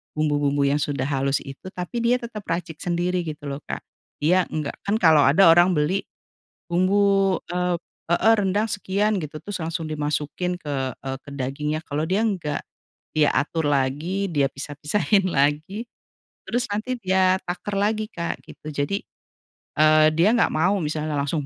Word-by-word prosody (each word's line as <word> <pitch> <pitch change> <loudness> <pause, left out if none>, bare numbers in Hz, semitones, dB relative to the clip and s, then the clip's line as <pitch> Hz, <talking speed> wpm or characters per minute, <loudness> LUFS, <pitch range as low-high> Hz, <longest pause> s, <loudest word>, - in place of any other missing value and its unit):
bumbu-bumbu 145 -2 +1
yang 140 +1 +2
sudah 140 -3 -1
halus 135 0 0
itu, 135 +7 -10
tapi 180 +7 -4
dia 240 +1 +4
tetep 230 -3 -7
racik 165 -2 -3
sendiri, 175 +1 0
gitu 150 -1 -6
loh, 140 0 -4
Kak. - - -5 0.4
Iya, 180 +3 +3
enggak 150 -2 -4
kan 205 - +2
kalau 160 -7 +5
ada 170 +7 +6
orang 175 +2 +6
beli 155 +6 +1 0.7
bumbu, 195 +1 +3 0.2
eee 180 0 0 0.3
heeh, 175 +7 +4
rendang 205 +3 +1
sekian 205 +1 0
gitu, 155 -2 -7
terus 205 -1 -4
langsung 160 0 -3
dimasukin 150 +4 -2
ke, 135 -4 -2
eee, 135 0 -3 0.2
dagingnya. 150 +4 -2
Kalau 150 +1 -2
dia 190 +5 +1
enggak, 180 -9 -1 0.5
dia 150 -2 +3
atur 160 +2 0
lagi, 145 +8 0
dia 145 -3 +2
pisah-pisahin 150 +9 0
lagi, 155 +8 0 0.6
terus 245 +1 -1
nanti 250 +5 -2
dia 190 -2 +3
takar 185 +3 -3
lagi, 215 +1 0
Kak, 170 -1 -4
gitu. 155 -1 -10
Jadi, 195 +8 -2 0.7
eee, 155 0 +6
dia 180 +7 +4
enggak 235 - +3
mau 185 +6 +3
misalnya 155 0 -2
langsung 145 +1 -1
165 Hz, 155 wpm, -24 LUFS, 150-195 Hz, 0.7 s, ada